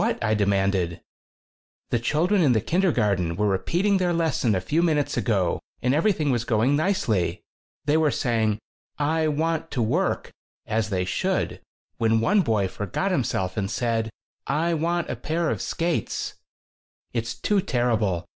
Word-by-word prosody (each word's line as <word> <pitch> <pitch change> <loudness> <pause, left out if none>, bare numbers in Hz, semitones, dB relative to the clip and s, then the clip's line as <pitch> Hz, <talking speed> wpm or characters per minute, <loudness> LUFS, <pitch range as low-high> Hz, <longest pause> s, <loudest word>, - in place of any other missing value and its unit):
I 110 0 +2
demanded. 100 -4 +1
14 - - -12 0.9
"The 120 - +2
children 170 - +2
in 140 -6 +4
the 110 - +3
kindergarten 105 - +1
were 105 - 0
repeating 175 - +1
their 180 -2 +1
lesson 160 -10 +1
a - - +1
few 145 - 0
minutes 155 -4 +1
ago 100 -7 +1 0.2
and 125 +1 +1
everything 155 -2 +2
was 120 -2 0
going 120 +4 +2
nicely. 125 - 0 0.4
They 150 +1 +3
were 160 -1 +3
saying 110 -5 +1 0.4
'I 155 +2 +1
want 160 +2 -1
to 125 - -2
work' 165 - 0 0.3
as 110 0 -1
they 90 -3 0
should 90 0 -1 0.4
when 115 0 +2
one 200 - +3
boy 110 - +1
forgot 105 - -2
himself 100 - -1
and 100 -2 -1
said: 115 -1 -1 0.4
'I 165 +4 +1
want 170 +2 0
a - - -2
pair 160 +1 -1
of - - -3
skates!' 170 0 -2 0.8
It's 115 -1 -2
too 200 - +1
terrible! 115 - 0
120 Hz, 155 wpm, -25 LUFS, 105-165 Hz, 0.9 s, in